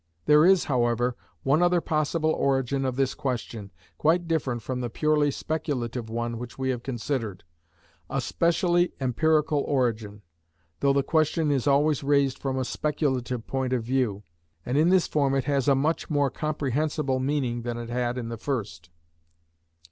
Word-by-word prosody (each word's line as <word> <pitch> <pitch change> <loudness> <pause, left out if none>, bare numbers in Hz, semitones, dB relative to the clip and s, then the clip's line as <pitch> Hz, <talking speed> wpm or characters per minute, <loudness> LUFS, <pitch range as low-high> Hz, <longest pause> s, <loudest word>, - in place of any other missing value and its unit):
There 150 - +6
is, 190 -2 +5
however, 120 -2 +1 0.3
one 140 +5 +3
other 175 0 +4
possible 155 0 0
origin 135 -1 0
of 130 -1 -1
this 135 0 +1
question, 120 -7 -4 0.3
quite 170 +3 +2
different 135 -8 -1
from 125 +1 -3
the 120 - -3
purely 150 +3 +2
speculative 130 -7 -3
one 115 0 -3
which 120 0 -8
we 130 0 0
have 125 -2 -4
considered, 120 - -3 0.7
a 135 - -1
specially 175 +5 +1
empirical 150 +3 +2
origin, 110 -7 -1 0.6
though 140 - +3
the 140 0 +2
question 155 +1 +1
is 135 -1 0
always 145 +1 +3
raised 140 -2 +2
from 135 -1 -2
a 130 - -1
speculative 130 -5 -2
point 130 -1 -2
of 125 -3 0
view, 120 -5 -1 0.4
and 125 - -2
in 155 +4 +4
this 185 -1 +4
form 140 -2 +1
it 135 - +1
has 140 -1 0
a 140 - +5
much 150 +5 0
more 145 -3 +1
comprehensible 150 -1 -1
meaning 130 -3 -1
than 120 0 -4
it 120 0 -6
had 125 0 -1
in 115 -2 -4
the 115 - -5
first. 100 - -4
135 Hz, 165 wpm, -26 LUFS, 120-150 Hz, 0.7 s, There